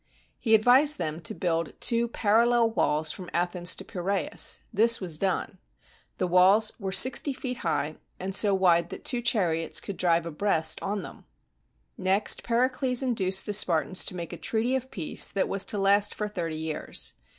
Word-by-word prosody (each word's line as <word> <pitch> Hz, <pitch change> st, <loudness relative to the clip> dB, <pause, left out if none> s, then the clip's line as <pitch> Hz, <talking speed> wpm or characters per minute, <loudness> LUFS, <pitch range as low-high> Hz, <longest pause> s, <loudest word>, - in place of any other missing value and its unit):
He 225 Hz, -3 st, +3 dB
advised 260 Hz, +7 st, +4 dB
them 155 Hz, +1 st, -4 dB
to 155 Hz, -, -2 dB
build 165 Hz, -3 st, -3 dB
two 235 Hz, 0 st, +2 dB
parallel 230 Hz, +1 st, +2 dB
walls 155 Hz, -7 st, 0 dB
from 180 Hz, -2 st, -9 dB
Athens 175 Hz, +1 st, 0 dB
to 195 Hz, -, -10 dB
Piraeus. 185 Hz, -2 st, -1 dB, 0.2 s
This 230 Hz, +3 st, +4 dB
was 170 Hz, -5 st, -4 dB
done. 190 Hz, -1 st, -2 dB, 0.6 s
These 185 Hz, -, -1 dB
walls 190 Hz, +5 st, +4 dB
were 195 Hz, -2 st, -4 dB
sixty 260 Hz, +8 st, +4 dB
feet 255 Hz, -1 st, -6 dB
high, 155 Hz, -5 st, -3 dB, 0.2 s
and 190 Hz, +1 st, -5 dB
so 205 Hz, 0 st, +3 dB
wide 175 Hz, -3 st, +2 dB
that -, -, -9 dB
two 245 Hz, -2 st, -1 dB
chariots 175 Hz, -9 st, 0 dB
could 200 Hz, -, -8 dB
drive 170 Hz, -2 st, +1 dB
abreast 160 Hz, -1 st, -1 dB
on 200 Hz, -1 st, -3 dB
them. -, -, -12 dB, 0.7 s
Next, 190 Hz, +3 st, +2 dB
Pericles 255 Hz, +2 st, 0 dB
induced 195 Hz, -7 st, 0 dB
the 210 Hz, -, -4 dB
Spartans 180 Hz, -2 st, +2 dB
to -, -, -7 dB
make 170 Hz, -2 st, -7 dB
a -, -, -7 dB
treaty 235 Hz, +3 st, -1 dB
of 260 Hz, 0 st, -4 dB
peace 170 Hz, -10 st, 0 dB
that 195 Hz, -, -1 dB
was 195 Hz, -1 st, -2 dB
to 210 Hz, -, -3 dB
last 200 Hz, +1 st, +2 dB
for 210 Hz, -, -3 dB
thirty 170 Hz, -6 st, -5 dB
years. 160 Hz, -1 st, -3 dB
195 Hz, 175 wpm, -26 LUFS, 175-225 Hz, 0.7 s, advised